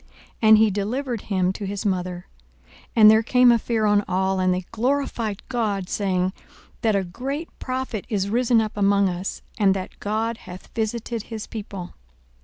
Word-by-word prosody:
And 220 -1 +7
he 220 -1 +4
delivered 230 +4 -2
him 185 -2 +1
to 200 0 -5
his 200 +2 -4
mother. 180 -2 -2 0.4
42:007:016 - - -23
And 215 -2 +9
there 220 0 +5
came 250 +1 +5
a 235 - +4
fear 225 -1 0
on 205 0 +3
all: 190 +1 0
and 185 0 +2
they 180 0 -1
glorified 235 -3 -1
God, 210 -7 -1
saying, 185 -2 0 0.5
That 220 -2 +2
a 195 - +1
great 275 - -5
prophet 255 -5 -3
is 200 -4 0
risen 235 +1 +3
up 215 -1 -4
among 200 -1 +3
us; 180 +2 -5 0.2
and, 195 -2 +4
That 185 -1 -6
God 220 +2 -1
hath 185 -2 -12
visited 225 0 -3
his 220 -2 -5
people. 200 -5 -7
210 Hz, 175 wpm, -23 LUFS, 190-230 Hz, 0.5 s, And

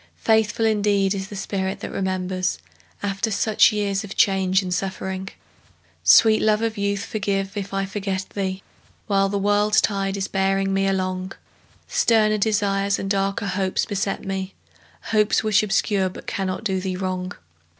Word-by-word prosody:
Faithful 220 0 +2
indeed 205 -2 +2
is 190 -1 -4
the 205 - -9
spirit 190 -1 -3
that - - -6
remembers 185 -1 -2 0.5
After 200 +2 -1
such 215 +2 +3
years 205 -1 -1
of 205 - -8
change 190 -1 +3
and 180 -1 -3
suffering! 190 0 -3 0.7
Sweet 220 -1 +6
love 215 0 +2
of 225 -1 -1
youth, 200 -1 -1
forgive 195 -2 -2
if 200 -1 -4
I 195 0 -1
forget 195 -1 -3
thee 190 -1 -3 0.4
While 195 -1 +2
the 200 - -1
world's 205 +1 +3
tide 195 -1 -1
is 195 - -2
bearing 195 0 0
me 195 0 +1
along; 185 -1 -2 0.5
Sterner 215 -2 +3
desires 200 -2 +1
and 195 - -3
darker 195 +1 0
hopes 190 -1 0
beset 200 0 -3
me, 190 0 -4 0.6
Hopes 215 0 +3
which 215 0 +3
obscure 200 -2 +1
but - - -11
cannot 190 0 -3
do 190 -4 0
thee 185 -1 -3
wrong. 185 -1 -3
195 Hz, 155 wpm, -23 LUFS, 190-205 Hz, 0.7 s, Sweet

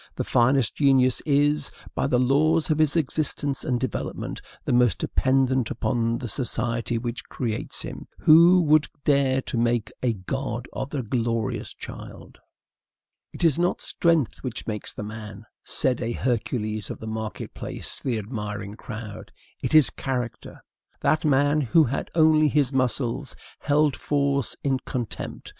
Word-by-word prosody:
The - - -2
finest 120 0 +2
genius 130 -3 +3
is, 145 0 +2 0.2
by - - 0
the 125 - +2
laws 155 +6 +3
of 155 - +1
his 155 -1 +3
existence 145 -2 -1
and 125 -1 0
development, 130 -3 -4 0.2
the - - 0
most 120 -5 +4
dependent 130 - +1
upon 115 -2 0
the 125 - -5
society 120 0 -1
which 120 +1 -5
creates 115 -4 -3
him. - - -8
Who 170 +3 +7
would 155 -1 +4 0.2
dare 135 -2 +3
to 120 - -2
make 120 -2 +1
a 125 -2 +1
god 120 +4 -4
of 135 - -4
the 140 -3 -3
glorious 115 -1 -2
child? - - -10 0.9
"It - - -7
is 165 -2 +3
not 175 +1 +1
strength 165 -7 +1
which 130 -1 -4
makes 105 -2 -4
the - - -6
man," 105 0 -8 0.2
said 125 -2 0
a 120 0 -2
Hercules 110 -3 -2
of - - -5
the - - -8
market 110 -2 -5
place - - -5
to - - -10
the 125 -4 0
admiring 105 -2 -5
crowd; 110 -1 -8 0.3
"it - - 0
is 155 -3 +6
character." 125 -3 -5 0.4
That 155 +2 +2
man, 145 +1 +3
who 150 +5 +4
had 140 0 -2
only 155 -1 +5
his 145 -2 +2
muscles, 130 0 0 0.2
held 150 -1 +2
force 140 -2 0
in 135 -2 +1
contempt. 125 -3 -5
130 Hz, 150 wpm, -25 LUFS, 115-145 Hz, 0.9 s, Who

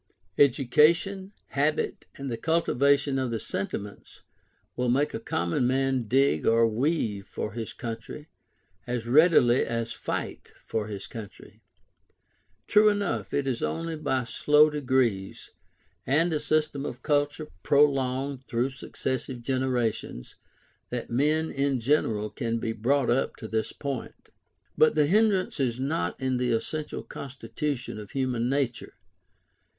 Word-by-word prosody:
Education, 155 +9 +3 0.2
habit, 145 +2 -1
and 135 -2 -5
the - - -1
cultivation 140 -1 +2
of 130 -1 -1
the 115 -1 -2
sentiments, 100 0 -5 0.5
will 125 0 0
make 140 +4 +2
a - - -3
common 85 +2 0
man 130 -2 +1
dig 135 - +2
or 115 0 +5
weave 110 -4 -1
for 105 - -4
his 115 +1 -5
country, 115 +5 -7 0.6
as 120 -2 -2
readily 130 -2 +5
as 115 -1 -3
fight - - -5
for 110 -1 -2
his 100 -2 -6
country. 105 -1 -11 1.0
True 210 0 +5
enough, 175 - -1
it 140 - 0
is 130 -3 -2
only 165 0 -2
by 140 -4 -1
slow 150 +5 +4
degrees, 130 -9 -1 0.6
and 160 +6 +2
a 155 - +1
system 150 -2 0
of - - -6
culture 145 +1 0
prolonged 135 0 +2
through 120 +3 0
successive 130 -1 -4
generations, 125 - -2 0.6
that 120 -1 -5
men 150 +6 +1
in 140 -1 0
general 110 -5 +1
can 115 +2 -2
be 115 0 -2
brought 125 +4 +1
up 125 - 0
to 110 - -8
this 110 0 -2
point. 140 -4 -6 0.5
But 155 - +4
the 150 -1 +4
hindrance 195 +1 +2
is 125 -3 0
not 90 -10 -1
in 130 -1 0
the 125 -1 +1
essential 150 +7 -3
constitution 135 -3 -5
of 105 -2 -9
human 125 -3 -1
nature. 130 -4 -2
130 Hz, 135 wpm, -27 LUFS, 115-145 Hz, 1.0 s, or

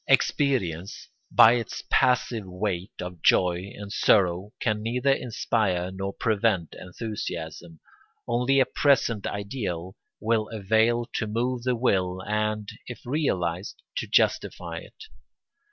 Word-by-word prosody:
Experience, 115 - +1 0.2
by 115 - +8
its 120 -3 -3
passive 120 -4 +2
weight 90 0 -3
of 90 -2 -6
joy 90 +2 +3
and 100 -1 -8
sorrow, 95 -2 +3
can 105 -2 0
neither 125 +5 +1
inspire 105 -8 0
nor 95 +1 -4
prevent 105 -6 0
enthusiasm; 85 -5 -6 0.5
only 125 +3 +2
a 130 - +5
present 125 -6 +2
ideal 100 -4 -4 0.2
will 110 -1 0
avail 110 +3 +2
to 110 - -1
move 120 +3 -1
the 125 +1 0
will 95 -6 +1
and, 105 0 -1 0.2
if 125 - -7
realised, 95 - -1
to - - -2
justify - - +1
it. - - -13
105 Hz, 120 wpm, -26 LUFS, 90-120 Hz, 0.5 s, by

